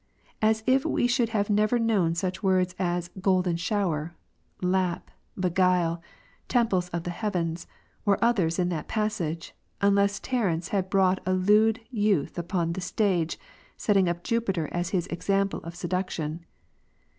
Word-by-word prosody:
As 220 0 +2
if 260 +1 +3
we 315 -6 +1
should 245 -1 +2
have 210 -2 0
never 215 +3 +3
known 205 -8 +2
such 185 +2 -2
words 185 -2 +2
as 175 -1 -1
"golden 185 -2 +2
shower," 170 -3 -1 0.4
"lap," 180 -1 0 0.3
"beguile," 180 -2 +2 0.5
"temples 195 -8 +1
of 170 -1 -3
the 175 - -3
heavens," 175 -4 -2 0.4
or 200 -1 +3
others 195 -9 +2
in 180 -1 +1
that 165 -4 -3
passage, 195 -7 -2 0.3
unless 200 0 +3
Terence 190 -10 -1
had 190 -2 -1
brought 190 -1 +3
a 185 - +2
lewd 210 +4 +3
youth 205 - +1
upon 170 -1 -1
the 185 - -4
stage, 180 -3 0 0.4
setting 195 -4 +2
up 175 0 -3
Jupiter 195 -9 0
as 175 0 -2
his 180 -3 0
example 195 +2 -1
of 170 +1 -8
seduction 175 -3 -3
*. - - -41
185 Hz, 145 wpm, -27 LUFS, 175-210 Hz, 0.5 s, if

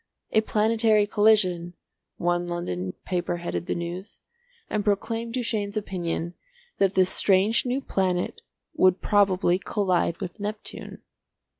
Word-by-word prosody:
"A 220 - +4
Planetary 220 0 +3
Collision," 200 -5 +2 0.4
one 175 0 0
London 95 - -3
paper 175 -1 -1
headed 175 0 -4
the - - -1
news, 175 +3 -6 0.5
and 210 -1 -1
proclaimed 225 +3 -1
Duchaine's 215 -4 -2
opinion 175 -4 -3 0.5
that 195 -1 +2
this 185 -1 +4
strange 200 +5 +3
new 255 +3 0
planet 185 -7 -1 0.3
would 185 0 +4
probably 190 -3 +3
collide 185 -5 0
with 175 +4 -6
Neptune. 210 +1 -6
195 Hz, 120 wpm, -25 LUFS, 175-215 Hz, 0.5 s, A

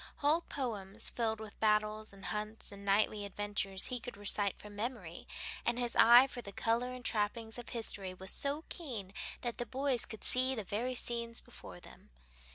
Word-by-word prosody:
Whole 300 +4 +3
poems, 220 - -2
filled 220 -2 0
with 220 -2 -9
battles 215 0 +2
and 195 -1 -12
hunts 215 +1 -4
and 200 0 -10
knightly 205 +1 +3
adventures, 200 -1 -2
he 250 - -1
could 245 -2 -8
recite 205 -1 +1
from 210 0 -11
memory, 210 -6 -4 0.4
and 235 - +1
his 240 -1 -1
eye 240 +3 +9
for 250 -2 -5
the 200 - -8
color 230 +4 +1
and 255 -1 -8
trappings 220 +1 0
of 240 - -8
history 200 -5 -2
was 190 +1 -7
so 285 +3 -1
keen 230 - -5 0.3
that 240 -2 -2
the 240 - -2
boys 265 -2 +1
could 220 - -9
see 260 +1 +5
the 220 - -3
very 235 +6 -1
scenes 235 -1 0
before - - -10
them. - - -15
220 Hz, 180 wpm, -34 LUFS, 205-245 Hz, 0.4 s, eye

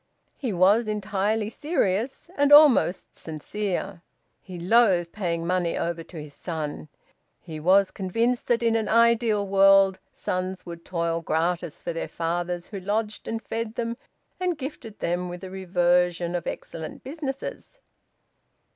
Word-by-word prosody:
He 255 -6 -2
was 200 +5 +4
entirely 210 +1 -1
serious, 260 - -1
and 285 0 +2
almost 290 - +6
sincere. 190 +3 -4 0.4
He 185 -2 -9
loathed 180 -3 +3
paying 170 -5 -2
money 180 -1 0
over 170 -1 -2
to 165 0 -10
his 150 -1 -9
son. 155 -3 -5 0.5
He 160 -3 -8
was 190 +4 +4
convinced 230 +6 -1
that 235 -1 +2
in 230 -1 +3
an 220 -1 0
ideal 230 -2 +3
world 195 -1 +5
sons 185 0 -3
would 170 -1 -8
toil 170 -2 -1
gratis 165 0 -1
for - - -3
their 165 - -3
fathers 175 +1 -2
who 200 - -7
lodged 210 +3 -2
and 225 - -2
fed 225 0 -4
them 235 0 -2 0.4
and 360 -3 0
gifted 260 -6 -7
them 175 +1 -1
with 175 0 -7
the 190 -1 -8
reversion 180 -2 +1
of 175 -2 -3
excellent 160 -1 -6
businesses. 275 - -6
190 Hz, 140 wpm, -25 LUFS, 175-225 Hz, 0.5 s, almost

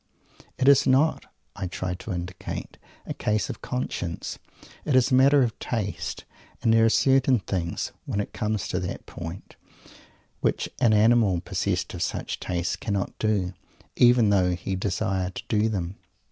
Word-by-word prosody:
It 130 - +1
is 140 -1 +6
not, 135 +5 +3 0.3
I 95 -2 -4
try 90 0 -3
to 95 +4 -7
indicate, 90 +1 -6 0.3
a - - -4
case 105 0 -1
of - - -10
conscience; 95 -9 -4 0.4
it 145 - 0
is 130 0 +4
a - - +2
matter 135 +2 +6
of 115 -3 -2
taste; 105 -4 -3 0.4
and 115 - +4
there 115 0 +5
are - - +5
certain 135 +1 +4
things, 90 -4 -3 0.2
when 100 - -1
it 105 - -3
comes 105 -2 -2
to 90 - -1
that 90 -1 -5
point, 85 +2 -8 0.8
which - - 0
an 120 -4 +4
animal 110 -4 +4
possessed 90 - -2
of - - -6
such - - -2
taste 85 -1 -2
cannot 100 -3 -2
do, 100 -4 0 0.4
even 120 -3 +5
though 90 -3 +3
he 90 +2 -4
desire 95 -1 -1
to - - -8
do 110 0 +2
them. 95 -3 -3
105 Hz, 160 wpm, -26 LUFS, 90-120 Hz, 0.8 s, is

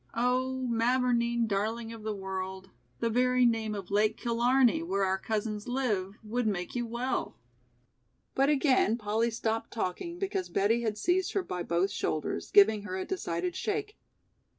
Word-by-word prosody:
Oh, 255 +2 0
Mavourneen 235 0 +2
darling 225 +3 -2
of 225 - -9
the 215 0 -3
world, 190 0 -5 0.3
the 230 - +1
very 250 +1 +3
name 225 -2 +1
of 195 -1 -7
Lake 215 +2 +2
Killarney, 240 -5 +3
where 190 +4 -1
our 190 0 0
cousins 215 0 -3
live, 215 -6 -1
would 230 +2 -1
make 180 -4 -2
you 240 -1 -2
well." 240 +3 -2 1.0
But 275 +1 +3
again 265 -6 +3
Polly 220 +1 0
stopped 225 0 -2
talking 235 - -3
because 390 -1 -2
Betty 215 +4 +2
had 220 -2 -2
seized 360 - +1
her 395 - 0
by 180 - -4
both 175 +3 0
shoulders, 155 -2 -2
giving 210 +1 +6
her 190 -2 -5
a 190 - -3
decided 175 - -3
shake. 420 0 -2
225 Hz, 155 wpm, -30 LUFS, 200-250 Hz, 1.0 s, giving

